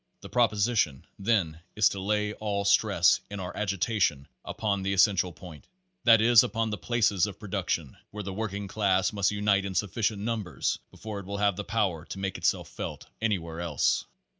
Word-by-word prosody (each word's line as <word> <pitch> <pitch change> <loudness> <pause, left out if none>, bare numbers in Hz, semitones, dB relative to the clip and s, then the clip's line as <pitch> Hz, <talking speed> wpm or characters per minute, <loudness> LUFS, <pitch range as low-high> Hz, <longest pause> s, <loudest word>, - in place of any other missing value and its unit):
The - - -10
proposition, 105 - +1
then, 95 -7 +1 0.2
is 105 - +5
to 100 - -5
lay 105 +2 0
all 100 -2 -2
stress 100 - +4
in 100 - -6
our 90 -1 -6
agitation 95 -7 0 0.2
upon 100 -2 -2
the 95 +1 -1
essential 95 -2 +3
point, 80 -2 -12 0.4
that 115 -2 +7
is 115 0 +7
upon 115 -1 -1
the 105 - -2
places 105 -6 +2
of 100 - -9
production, 95 -8 -3
where 105 0 -6
the 95 0 -5
working 100 -1 -4
class 95 -2 +1
must 100 -2 +2
unite 105 -1 +2
in 95 -1 -5
sufficient 105 +1 -1
numbers 110 -4 -2
before 110 -2 -7
it 95 - -10
will 100 0 -4
have 100 -1 +2
the 105 - -4
power 95 -8 -1
to - - -7
make 95 -1 -3
itself - - 0
felt - - -7 0.2
anywhere 85 -7 -1
else. 75 -7 +1
100 Hz, 180 wpm, -28 LUFS, 95-105 Hz, 0.4 s, that